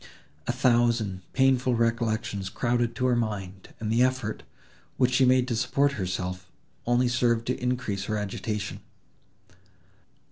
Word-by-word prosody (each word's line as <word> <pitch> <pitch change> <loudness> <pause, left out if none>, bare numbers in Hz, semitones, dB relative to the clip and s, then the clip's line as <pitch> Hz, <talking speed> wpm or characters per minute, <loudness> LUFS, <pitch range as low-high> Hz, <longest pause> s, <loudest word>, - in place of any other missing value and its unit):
A - - +2
thousand 120 -6 +2
painful 130 -2 +3
recollections 115 -3 -1
crowded 120 +2 0
to 130 - -1
her 125 -1 +3
mind, 100 -5 -4
and 110 -1 -2
the 115 +2 +3
effort, 130 -4 0 0.6
which 125 -1 +3
she 130 +1 +5
made 130 0 +4
to 120 - 0
support 140 +4 +2
herself, 90 -4 -4 0.4
only 120 +1 +3
served 120 -1 +1
to 125 +1 -2
increase 125 -6 -1
her 110 0 -1
agitation. 105 +1 -4
120 Hz, 135 wpm, -27 LUFS, 105-125 Hz, 0.6 s, she